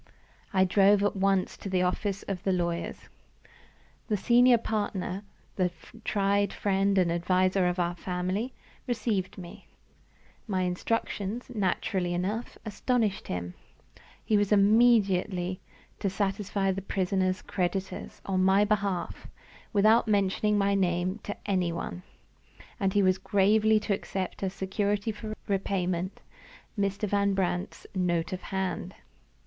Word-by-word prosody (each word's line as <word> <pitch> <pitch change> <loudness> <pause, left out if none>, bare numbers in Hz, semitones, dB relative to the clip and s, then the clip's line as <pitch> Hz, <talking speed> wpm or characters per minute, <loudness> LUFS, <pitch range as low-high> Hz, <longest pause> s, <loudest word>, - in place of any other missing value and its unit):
I 190 -1 +4
drove 200 +2 +4
at 205 - +1
once 195 -1 +1
to 195 - -6
the 185 -1 +2
office 195 +2 -1
of 190 -2 -4
my 195 - +1
lawyers. 170 -2 -2 1.0
The 210 - +1
senior 245 +3 +5
partner 205 -3 -3 0.3
the 185 -2 +2 0.3
tried 200 0 +1
friend 195 0 +1
and 180 -3 +3
adviser 185 +2 +2
of 180 +1 -1
our 175 -1 0
family 185 +7 -2 0.4
received 220 -6 -1
me. 175 -2 -10 0.8
My 190 -3 0
instructions, 210 +5 -2
naturally 185 -3 0
enough, 205 +7 -3
astonished 220 -1 0
him. 90 0 -4 0.7
He 215 - +3
was 205 0 +1
immediately 200 -4 +3 0.4
to 200 - 0
satisfy 195 0 -1
the 190 +1 -3
prisoner's 185 -1 0
creditors, 185 +1 -3
on 185 -1 +1
my 195 +2 +5
behalf, 200 -3 -1 0.4
without 220 +3 +4
mentioning 205 0 +2
my 200 0 +2
name 185 +1 0
to 205 - -6
any 185 -4 +1
one. 170 +1 -5 0.8
And 195 -1 +1
he 205 - +3
was 185 0 +3
gravely 215 +2 +3
to 210 - 0
accept 190 -1 -4
as 190 -1 -1
security 200 +3 -1
for 215 0 -6
repayment 185 -2 -1 0.5
Mr. 200 0 -1
Van 200 0 +1
Brandt's 185 0 -2
note 175 -3 0
of 185 - -4
hand! 190 -1 -3
195 Hz, 130 wpm, -28 LUFS, 185-205 Hz, 1.0 s, senior